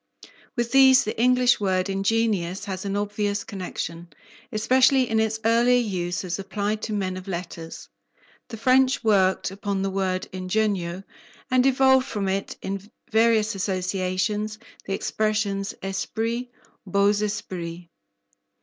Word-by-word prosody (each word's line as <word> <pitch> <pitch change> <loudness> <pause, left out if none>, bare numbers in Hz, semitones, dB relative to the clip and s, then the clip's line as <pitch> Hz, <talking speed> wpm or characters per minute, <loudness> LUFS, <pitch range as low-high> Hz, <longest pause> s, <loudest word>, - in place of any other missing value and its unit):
With 240 -2 -1
these 265 0 +7
the 215 - -3
English 250 0 +4
word 185 -2 0
ingenious 195 -2 0
has 190 -1 -5
an 200 0 -1
obvious 205 0 -1
connection, 175 -4 -6 0.4
especially 255 +3 +3
in 225 -1 +1
its 220 0 0
earlier 235 +2 +4
use 180 -6 -2
as 180 0 -3
applied 205 +2 -2
to 220 - -4
men 190 -2 -2
of 185 +1 -9
letters. 170 -3 -6 0.6
The 225 - -8
French 255 +3 +3
worked 190 -4 +2
upon 200 0 -3
the 195 - -1
word 185 -1 -1
"ingegno" 185 -1 -1 0.5
and 255 +1 +4
evolved 265 0 +4
from 205 -5 -2
it 195 +1 -3
in 195 +1 -5 0.2
various 225 -1 +3
associations 190 +2 -1 0.3
the 195 - -2
expressions 205 -2 -1
"esprit," 230 +5 -2 0.4
"beaux 200 +2 +3
Esprits." 180 -5 -4
205 Hz, 130 wpm, -24 LUFS, 190-225 Hz, 0.6 s, these